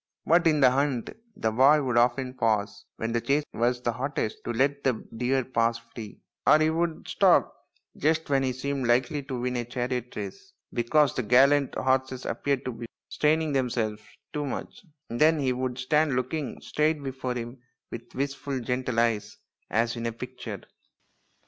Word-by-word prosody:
But 170 +1 +4
in 155 -2 +3
the 130 -2 +7
hunt 135 -2 0 0.2
the 110 - 0
boy 140 +6 +5
would 125 -2 -1
often 125 +2 +2
pause 110 -4 -1
when 115 +1 -3
the 120 0 0
chase 140 +4 +1
was 120 +2 0
hottest 120 -1 -2
to - - -2
let 140 +4 +1
the 130 - +3 0.2
deer 130 +3 +1
pass 115 -2 +1
free; 115 -2 -11 0.3
or 150 - +8
he 155 0 +2
would 165 0 -2
stop - - +4 0.4
just 160 +2 +1
when 135 -1 +2
he 130 -1 0
seemed 135 0 -2
likely 130 +4 +2
to 135 -2 -5
win 125 0 -1
a 120 - -1
chariot 125 0 -3
race 400 -1 -7 0.2
because 135 +4 +3
the - - -1
gallant 135 +4 +4
horses 130 0 0
appeared 140 -2 -1
to 130 - -2
be 115 0 -8 0.2
straining 155 0 +1
them 130 -2 +1
selves 110 -3 -2 0.3
too 150 - -2
much; 135 - -6 0.3
and 120 - -3
then 160 +1 +6
he 130 -3 +1
would 125 0 -3
stand 150 +2 +2
looking 130 +3 -2
straight 150 -1 0
before 130 -2 -3
him 120 +2 -6 0.3
with 120 +1 -9
wistful 140 0 -2
gentle 125 -1 -1
eyes 115 -3 0 0.3
as 115 +3 +1
in 115 0 -3
a - - -1
picture. 120 -3 -7
130 Hz, 175 wpm, -27 LUFS, 120-140 Hz, 0.4 s, or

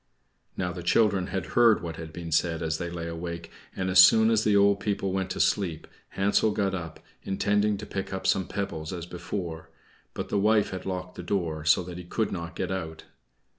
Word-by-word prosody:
Now 90 -1 -2
the 90 - -6
children 95 +1 +2
had 95 -2 -3
heard 115 -5 +5
what 80 -1 -5
had 80 -1 -7
been 85 0 -7
said 80 +1 +1
as 80 0 -1
they 85 - -3
lay 85 -1 -5
awake, 85 0 -6 0.2
and 95 - -2
as 95 0 +4
soon 110 +4 +7
as 110 -1 +3
the 105 -1 +3
old 100 0 +4
people 100 -2 -1
went 95 0 -1
to - - -4
sleep 85 -6 +1 0.3
Hansel 100 +2 +3
got 100 -2 0
up, 85 -4 -5 0.2
intending 105 +2 +1
to 105 - -7
pick 95 - -5
up 95 0 -4
some 95 -2 +2
pebbles 80 -6 -4
as 85 -3 -5
before; 85 -2 -6 0.5
but - - -4
the 100 - +1
wife 105 +1 +3
had 95 0 -6
locked 90 -1 -4
the - - -4
door, 85 -5 -2
so 80 +3 +4
that 90 0 -8
he - - -7
could 110 +5 -2
not 85 -1 -5
get 95 0 -3
out. 80 -4 -5
90 Hz, 210 wpm, -27 LUFS, 85-100 Hz, 0.5 s, soon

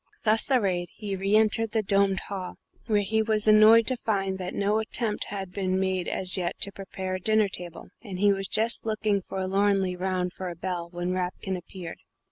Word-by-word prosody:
Thus 220 +3 +3
arrayed 190 -9 +1
he 205 -3 -4
re 195 +2 0
entered 220 +1 +3
the 220 -1 +1
domed 195 -1 +2
hall, 190 -2 -6 0.3
where 210 -3 +2
he 220 +3 +1
was 220 -1 +2
annoyed 215 +2 +7
to 255 - 0
find 195 -4 -2
that 180 0 -5
no 205 +2 +1
attempt 220 0 -1
had 195 -2 -6
been 185 -1 -1
made 190 -2 -1
as 185 -1 +2
yet 175 -2 -3
to 200 - +3
prepare 190 -1 -6
a 185 - -2
dinner 215 +1 +3
table, 180 -3 -6
and 200 -6 -7
he 200 +1 +4
was 195 0 -4
just 225 +2 0
looking 215 -2 0
forlornly 190 0 0
round 180 0 -2
for 185 -1 -5
a 175 - -7
bell 175 -1 -4
when 175 0 -3
Rapkin 185 +1 -3
appeared. 175 -1 -9
195 Hz, 195 wpm, -26 LUFS, 185-215 Hz, 0.3 s, annoyed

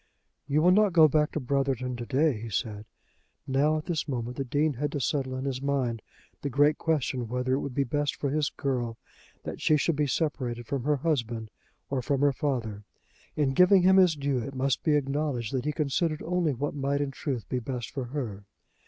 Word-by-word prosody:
"You 150 +2 +2
will 180 - +6
not 205 0 +4
go 160 -2 +8
back 150 0 +2
to - - -1
Brotherton 130 -2 -1
to 120 -1 -6
day," 140 -4 +2
he 115 - -6
said. 105 +1 -3 0.6
Now, 145 +4 +2
at 155 - -5
this 165 -3 -2
moment 125 -3 -3
the 135 - -1
Dean 145 +4 +1
had 145 +3 -2
to 145 - -1
settle 130 +1 -1
in 130 +1 -4
his 130 -2 -2
mind 130 -5 -1 0.4
the 140 - -2
great 145 +3 +3
question 130 -6 0
whether 125 +2 -1
it 135 - +2
would 140 -3 -5
be 140 - +2
best 145 +2 -1
for 140 - -2
his 150 0 +1
girl 120 -4 -2 0.5
that - - -6
she 155 - +4
should 155 +2 +1
be 150 0 +1
separated 125 -4 -2
from 135 0 -3
her 150 0 +3
husband 120 -7 -2 0.4
or 135 -2 0
from 140 +2 0
her 145 -1 +4
father. 115 -8 -2 0.5
In 140 -3 +1
giving 180 +4 +6
him 190 +1 +6
his 180 -4 +5
due 140 -2 -1
it 135 +3 -6
must 130 0 0
be 155 -2 +2
acknowledged 140 -4 -1
that 130 0 -1
he 150 - +1
considered 155 +1 -1
only 170 -4 0
what 145 +4 -2
might 140 0 -1
in 140 -1 -1
truth 130 -4 -4
be 125 - -1
best 125 -1 -5
for 135 -4 -4
her. 120 -7 -5
140 Hz, 215 wpm, -28 LUFS, 125-150 Hz, 0.6 s, go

